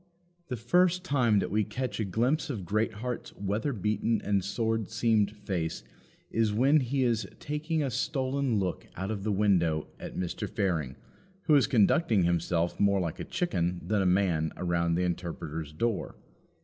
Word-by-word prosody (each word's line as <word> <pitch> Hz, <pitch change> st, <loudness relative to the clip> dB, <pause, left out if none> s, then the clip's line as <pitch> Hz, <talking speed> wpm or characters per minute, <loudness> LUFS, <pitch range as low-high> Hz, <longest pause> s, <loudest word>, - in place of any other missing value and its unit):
The 125 Hz, -, -3 dB
first 180 Hz, -, +2 dB
time 125 Hz, -, +2 dB
that 100 Hz, -, 0 dB
we 105 Hz, +1 st, +2 dB
catch 125 Hz, 0 st, -4 dB
a 110 Hz, -, 0 dB
glimpse 130 Hz, -, 0 dB
of 105 Hz, -10 st, -4 dB
Greatheart's 110 Hz, +5 st, -2 dB
weather 105 Hz, +7 st, -1 dB
beaten 105 Hz, 0 st, 0 dB
and 100 Hz, -2 st, +1 dB
sword 110 Hz, +1 st, -1 dB
seamed 110 Hz, -2 st, +2 dB
face 90 Hz, -6 st, -3 dB, 0.5 s
is 110 Hz, -1 st, +2 dB
when 135 Hz, +8 st, +4 dB
he 130 Hz, 0 st, 0 dB
is 115 Hz, -2 st, +1 dB
taking 155 Hz, +1 st, -2 dB
a 135 Hz, -, -1 dB
stolen 130 Hz, 0 st, 0 dB
look 95 Hz, -3 st, -2 dB
out 95 Hz, +3 st, -3 dB
of 100 Hz, -3 st, -4 dB
the 110 Hz, -, 0 dB
window 90 Hz, -6 st, +2 dB
at -, -, -7 dB
Mr. 90 Hz, -2 st, -3 dB
Fearing, 80 Hz, -9 st, -1 dB, 0.5 s
who 160 Hz, -, +3 dB
is 135 Hz, -7 st, +5 dB
conducting 110 Hz, -, +3 dB
himself 85 Hz, 0 st, 0 dB
more 100 Hz, -1 st, +3 dB
like 85 Hz, -4 st, -3 dB
a -, -, -3 dB
chicken 90 Hz, -, -1 dB
than 105 Hz, +2 st, +1 dB
a 95 Hz, -, +2 dB
man 90 Hz, -4 st, +2 dB
around 85 Hz, -1 st, +1 dB
the 90 Hz, -, +1 dB
Interpreter's 80 Hz, -3 st, -4 dB
door. 110 Hz, +7 st, -2 dB
105 Hz, 165 wpm, -29 LUFS, 90-125 Hz, 0.5 s, is